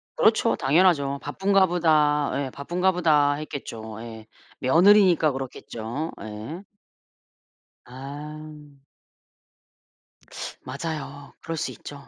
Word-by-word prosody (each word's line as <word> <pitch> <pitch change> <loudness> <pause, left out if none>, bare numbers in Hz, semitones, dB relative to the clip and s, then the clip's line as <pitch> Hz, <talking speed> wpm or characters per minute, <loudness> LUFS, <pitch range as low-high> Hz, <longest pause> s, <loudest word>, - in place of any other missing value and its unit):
그렇죠. 225 +1 +3
당연하죠. 140 -2 +2
'바쁜가 190 +6 +2
보다.' 155 -4 +2
예 140 -1 -2
'바쁜가 175 +6 0
보다.' 150 -5 +3
했겠죠. 115 -7 -7
예. 110 -2 -10 0.3
며느리니까 175 +2 +5
그렇겠죠. 130 +2 -5
예. 110 - -7 1.2
아. 145 +2 -10 1.8
맞아요. 140 0 -6
그럴 165 -1 -5
수 165 - -2
있죠. 140 -1 -11
150 Hz, 205 characters per minute, -25 LUFS, 135-165 Hz, 1.8 s, 며느리니까